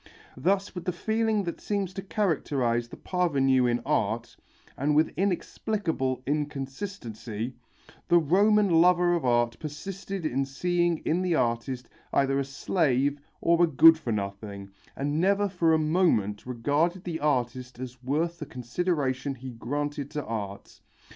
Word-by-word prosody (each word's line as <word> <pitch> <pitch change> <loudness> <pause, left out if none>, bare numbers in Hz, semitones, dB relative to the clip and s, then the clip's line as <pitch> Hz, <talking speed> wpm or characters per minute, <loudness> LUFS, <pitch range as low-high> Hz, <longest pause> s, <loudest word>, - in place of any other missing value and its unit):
Thus 195 +3 0
with 180 -2 -7
the 180 - +1
feeling 220 +3 0
that 170 -2 -5
seems 200 -3 -2
to 195 - -5
characterize 140 - 0
the - - -10
parvenu 135 -8 +2
in 120 0 0
art, 115 -5 -1 0.4
and 145 +2 +1
with 155 +1 +3
inexplicable 175 - -1
inconsistency, 135 - -4 0.5
the 175 - +5
Roman 200 +6 +4
lover 175 0 +4
of 170 -6 0
art 120 -1 +2
persisted 185 +4 -6
in 135 -2 +1
seeing 175 +5 0
in 170 +3 +1
the 180 -3 +1
artist 120 0 -1 0.2
either 135 0 +2
a 140 - -1
slave 140 -1 0 0.2
or 170 +1 +4
a - - +5
good 165 +2 +8
for 150 -7 -4
nothing, 100 -1 -5 0.2
and 145 +3 -1
never 200 +2 +3
for 175 -4 +1
a 160 - +5
moment 155 - +1
regarded 145 +9 0
the 165 -2 -4
artist 125 -3 -1
as 125 0 -8
worth 160 +6 -1
the 150 - -6
consideration 135 0 -2
he 130 0 -8
granted 145 +4 -3
to 150 -2 -4
art. 100 -3 -6
145 Hz, 145 wpm, -27 LUFS, 125-175 Hz, 0.5 s, good